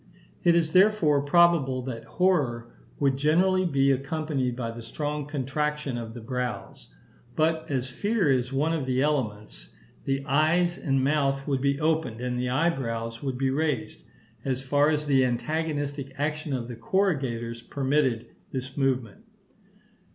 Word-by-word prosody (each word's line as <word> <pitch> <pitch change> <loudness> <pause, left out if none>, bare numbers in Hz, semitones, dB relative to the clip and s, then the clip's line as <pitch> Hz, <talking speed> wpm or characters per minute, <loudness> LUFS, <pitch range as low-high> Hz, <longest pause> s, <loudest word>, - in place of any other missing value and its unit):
It 170 -1 +5
is, 160 -2 +1
therefore, 185 -7 +4
probable 145 -4 +3
that 120 -3 -6
horror 130 -11 0 0.3
would 135 -2 +2
generally 185 +6 +3
be 140 -4 +3
accompanied 135 -2 -1
by 120 -2 -3
the 115 +1 -8
strong 145 +5 -4
contraction 145 0 -2
of 115 -1 -6
the 120 - -7
brows; 125 +1 -5 0.5
but 160 0 +1
as 130 -2 -2
fear 200 - +1
is 125 -1 +1
one 150 +5 +1
of 150 -5 -2
the 130 +1 +1
elements, 105 - -2 0.4
the 135 0 -1
eyes 160 +5 +2
and 135 -2 +1
mouth 140 -1 +1
would 135 -2 0
be 140 0 +1
opened, 155 -7 0
and 125 0 -2
the 125 0 -1
eyebrows 120 -6 -1
would 135 -3 -3
be 135 0 +1
raised, 150 -3 -2 0.4
as 130 -1 -2
far 145 +2 +3
as 150 -1 0
the 135 -3 +4
antagonistic 145 +1 -2
action 150 +1 -2
of 125 -3 -2
the 120 - -7
corrugators 120 - -1
permitted 135 -2 0 0.3
this 130 0 -5
movement. 130 -6 -1
135 Hz, 150 wpm, -26 LUFS, 125-155 Hz, 0.5 s, It